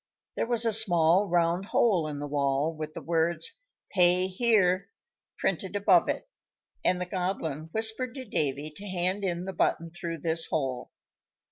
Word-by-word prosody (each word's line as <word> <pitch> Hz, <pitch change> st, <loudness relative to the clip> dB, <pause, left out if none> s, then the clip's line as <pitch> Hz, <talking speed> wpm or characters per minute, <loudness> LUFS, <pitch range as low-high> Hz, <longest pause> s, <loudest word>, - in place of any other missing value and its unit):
There -, -, -1 dB
was 235 Hz, -1 st, +2 dB
a 225 Hz, -, +2 dB
small 185 Hz, -2 st, +3 dB
round 175 Hz, +1 st, +1 dB
hole 195 Hz, -7 st, +2 dB
in 150 Hz, -1 st, -5 dB
the 145 Hz, -, -4 dB
wall, 140 Hz, +2 st, 0 dB
with 155 Hz, 0 st, -6 dB
the -, -, -7 dB
words 165 Hz, -, 0 dB, 0.3 s
"PAY 180 Hz, -1 st, +4 dB
HERE" 190 Hz, -2 st, +2 dB, 0.5 s
printed 190 Hz, +2 st, -2 dB
above 195 Hz, -4 st, +4 dB
it, -, -, -2 dB, 0.6 s
and 180 Hz, -, +2 dB
the 180 Hz, -, -2 dB
Goblin 180 Hz, -5 st, -3 dB
whispered 220 Hz, +4 st, 0 dB
to 260 Hz, -2 st, -6 dB
Davy 150 Hz, -, -1 dB
to 205 Hz, -, -8 dB
hand 185 Hz, +2 st, 0 dB
in 175 Hz, -1 st, -2 dB
the 190 Hz, -, -5 dB
button 165 Hz, -1 st, 0 dB
through 170 Hz, -2 st, -6 dB
this 165 Hz, 0 st, 0 dB
hole. 130 Hz, -5 st, -2 dB
175 Hz, 160 wpm, -28 LUFS, 160-195 Hz, 0.6 s, PAY